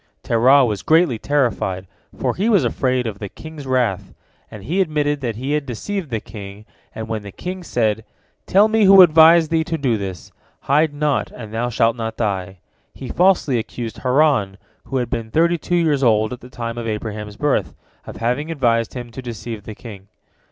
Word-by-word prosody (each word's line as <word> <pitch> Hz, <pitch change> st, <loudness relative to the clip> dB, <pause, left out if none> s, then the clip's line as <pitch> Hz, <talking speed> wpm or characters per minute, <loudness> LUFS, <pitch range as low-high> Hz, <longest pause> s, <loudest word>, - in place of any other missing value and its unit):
Terah 130 Hz, +4 st, +4 dB
was 105 Hz, -4 st, -2 dB
greatly 160 Hz, -8 st, +3 dB
terrified, 115 Hz, -10 st, -1 dB, 0.3 s
for -, -, -1 dB
he 205 Hz, +5 st, 0 dB
was 200 Hz, -, +4 dB
afraid 125 Hz, +1 st, 0 dB
of 105 Hz, -3 st, -5 dB
the 100 Hz, -, -6 dB
king's 155 Hz, +1 st, -10 dB
wrath, 115 Hz, -7 st, -1 dB, 0.3 s
and 105 Hz, -3 st, -10 dB
he 170 Hz, -, 0 dB
admitted 145 Hz, -4 st, 0 dB
that 120 Hz, -4 st, -3 dB
he 130 Hz, +5 st, -4 dB
had 150 Hz, -1 st, -1 dB
deceived 170 Hz, -, -4 dB
the 115 Hz, -3 st, -2 dB
king, 100 Hz, -1 st, -10 dB, 0.3 s
and 110 Hz, 0 st, -5 dB
when 110 Hz, -1 st, -3 dB
the 100 Hz, -1 st, -9 dB
king 185 Hz, -, -6 dB
said, 110 Hz, -9 st, -1 dB, 0.4 s
"Tell 200 Hz, +3 st, +5 dB
me 220 Hz, -1 st, +3 dB
who 195 Hz, -1 st, +9 dB
advised 160 Hz, 0 st, +6 dB
thee 165 Hz, -1 st, +2 dB
to 165 Hz, -1 st, -2 dB
do 125 Hz, -7 st, 0 dB
this. 95 Hz, -3 st, -7 dB, 0.3 s
Hide 150 Hz, +3 st, +2 dB
naught, 145 Hz, 0 st, -1 dB
and 110 Hz, -3 st, -10 dB
thou 120 Hz, +2 st, -1 dB
shalt 115 Hz, -1 st, +2 dB
not 115 Hz, -1 st, -5 dB
die," 95 Hz, -4 st, -2 dB, 0.4 s
he 130 Hz, -, -8 dB
falsely 175 Hz, -8 st, +2 dB
accused 115 Hz, 0 st, -6 dB
Haran, 130 Hz, -7 st, +2 dB, 0.3 s
who 135 Hz, -, -3 dB
had 120 Hz, -2 st, -2 dB
been 115 Hz, -3 st, -3 dB
thirty 170 Hz, +6 st, +2 dB
two 175 Hz, -, -2 dB
years 155 Hz, -5 st, +2 dB
old 110 Hz, -2 st, +2 dB
at 125 Hz, -, -9 dB
the 125 Hz, -, -12 dB
time 115 Hz, -2 st, -5 dB
of 115 Hz, -, -5 dB
Abraham's 105 Hz, -1 st, -5 dB
birth, 145 Hz, -2 st, 0 dB, 0.3 s
of -, -, -8 dB
having 125 Hz, +7 st, -1 dB
advised 120 Hz, -7 st, 0 dB
him 120 Hz, -1 st, -7 dB
to 130 Hz, -, -8 dB
deceive 115 Hz, -2 st, -7 dB
the 110 Hz, -, -8 dB
king. 100 Hz, -4 st, -11 dB
125 Hz, 195 wpm, -20 LUFS, 110-150 Hz, 0.4 s, who